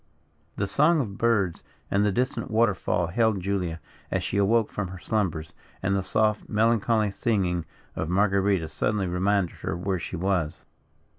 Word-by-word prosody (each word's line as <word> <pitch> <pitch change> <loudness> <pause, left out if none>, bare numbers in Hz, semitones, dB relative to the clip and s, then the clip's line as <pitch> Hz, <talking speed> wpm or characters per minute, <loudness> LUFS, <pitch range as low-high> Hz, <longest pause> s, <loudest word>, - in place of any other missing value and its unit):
The 100 - -1
song 150 +10 +3
of 105 -8 -3
birds 105 -7 +1 0.3
and 100 +1 +3
the 105 - +2
distant 120 +2 -1
water 110 -1 +3
fall 90 -1 -1
hailed 110 +2 +2
Julia, 90 -3 -2 0.3
as - - -1
she - - -2
awoke 105 +2 +3
from 105 -2 -3
her 95 +1 -8
slumbers; 90 -6 -2 0.3
and 100 +1 +1
the 100 - +1
soft, 105 +2 0
melancholy 110 -1 +2
singing 95 -6 0 0.3
of 80 - -3
Marguerita 95 -2 +2
suddenly 105 +5 -1
reminded 95 +1 0
her 80 - -3
where 95 +1 -1
she 90 - -5
was. 90 -3 -1
100 Hz, 160 wpm, -26 LUFS, 90-110 Hz, 0.3 s, song